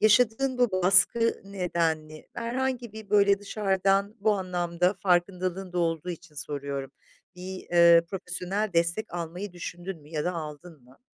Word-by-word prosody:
yaşadığın 245 +4 +3
bu 245 -5 +2
baskı 195 +5 +5
nedenli, 165 -5 -2
herhangi 245 0 -3
bir, 215 -2 -11
böyle, 200 -1 +4
dışarıdan 195 0 0
bu 215 +1 +3
anlamda 180 -1 0
farkındalığın 185 0 0
da 180 - -2
olduğu 165 0 -1
için 170 -2 -10
soruyorum, 140 -2 -4 0.5
bir, 185 +1 -7
eee, 170 -1 +7
profesyonel 195 +2 -2
destek 170 +4 0
almayı 175 +3 -5
düşündün 175 -1 -7
mü 145 - -17
ya 150 -2 -2
da 180 - 0
aldın 155 -3 -8
mı? 130 +1 -21
180 Hz, 140 wpm, -27 LUFS, 170-200 Hz, 0.5 s, eee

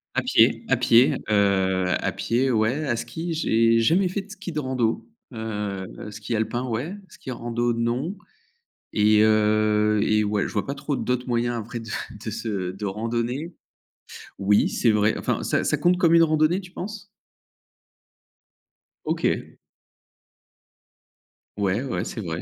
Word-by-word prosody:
à - - +1
pied, - - +3
à - - +3
pied, 120 +3 +5
heu, 95 -3 +2
à - - -1
pied 125 +3 0
ouais. 120 +6 +1
À 120 - +1
ski, 160 +9 -4
j'ai 115 -6 +3
jamais 180 +11 +3
fait 195 +3 -2
de 205 - -16
ski 195 -3 -7
de 155 - -2
rando, 130 -5 -1 0.2
heu, 105 -4 -4 0.2
ski 105 +2 -4
alpin 115 +3 -1
ouais, 125 - -3
ski 130 - -12
rando 120 0 -1
non 120 - -2 0.8
et 105 0 +4
heu 105 0 +3
et 110 0 +2
ouais, 105 -1 0
je - - -9
vois 105 - -1
pas 140 - -3
trop 145 +1 -3
d'autres 125 -1 -2
moyens 120 0 0
après 115 +1 -5
de 115 -1 -8 0.3
de 110 - -3
se 105 -5 -3
de 95 +3 -6
randonner. 115 - -3 0.9
Oui 100 +1 +3
c'est 115 - +2
vrai, 105 +1 +2
enfin, - - -1
ça - - 0
ça - - +1
compte 175 +1 +3
comme 170 -2 +4
une 165 - +7
randonnée, 155 +3 +2
tu 185 -2 -13
penses? 205 +2 -7 2.0
OK. - - -1 2.0
Ouais, 100 +2 0
ouais, 135 - -3
c'est 110 - -5
vrai. 85 -2 -4
115 Hz, 155 wpm, -24 LUFS, 105-140 Hz, 2.0 s, une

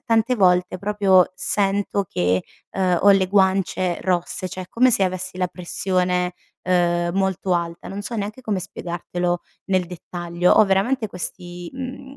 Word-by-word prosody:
tante 230 +1 +2
volte 180 -2 +3
proprio 200 -2 +3
sento 200 +1 0
che, 90 +1 +1 0.3
uhm, 185 -2 +1
ho 200 - +7
le 195 -1 +4
guance 190 -2 +1
rosse, 185 0 -1
cioè, 185 +1 -6
è 180 - -12
come 255 +2 +4
se 230 -4 +2
avessi 185 0 -3
la 180 -1 0
pressione, 180 0 -1 0.3
uhm, 175 -1 +2
molto 190 0 0
alta. 170 -1 -2
Non 195 - -5
so 230 +3 -5
neanche 210 +3 -4
come 215 -6 -2
spiegartelo 175 -1 -3 0.3
nel 185 -2 +1
dettaglio. 175 0 -1
Ho - - +6
veramente 210 +5 +1
questi, 175 -1 -7
mhmm, 265 +1 -7
185 Hz, 155 wpm, -22 LUFS, 180-200 Hz, 0.3 s, ho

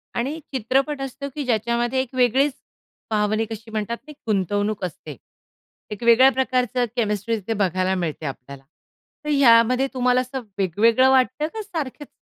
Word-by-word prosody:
आणि 275 +7 -2
चित्रपट 270 +4 0
असतो, 270 +1 -5
की 295 - -3
ज्याच्यामध्ये 235 +2 0
एक 260 0 -8
वेगळीच 260 +3 +3 0.6
भावनिक 215 +1 0
अशी 225 0 -8
म्हणतात 220 +2 -3
ती 300 - -9 0.2
गुंतवणूक 205 0 0
असते. 155 -3 -8 0.8
एक 210 +2 -6
वेगळ्या 235 +3 +7
प्रकारचं 255 -2 0
केमिस्ट्री 220 -1 -1
तिथे 210 +3 -3
बघायला 185 -2 0
मिळते 165 -3 -3
आपल्याला. 135 0 -8 0.6
तर - - -3
यामध्ये 255 -2 +5
तुम्हाला 250 -1 +2
असं 255 +1 -5 0.2
वेगवेगळं 225 +7 +3
वाटतं 265 +3 +2
का 445 - -4
सारखंच? 310 - -6
235 Hz, 140 wpm, -22 LUFS, 210-265 Hz, 0.8 s, वेगळ्या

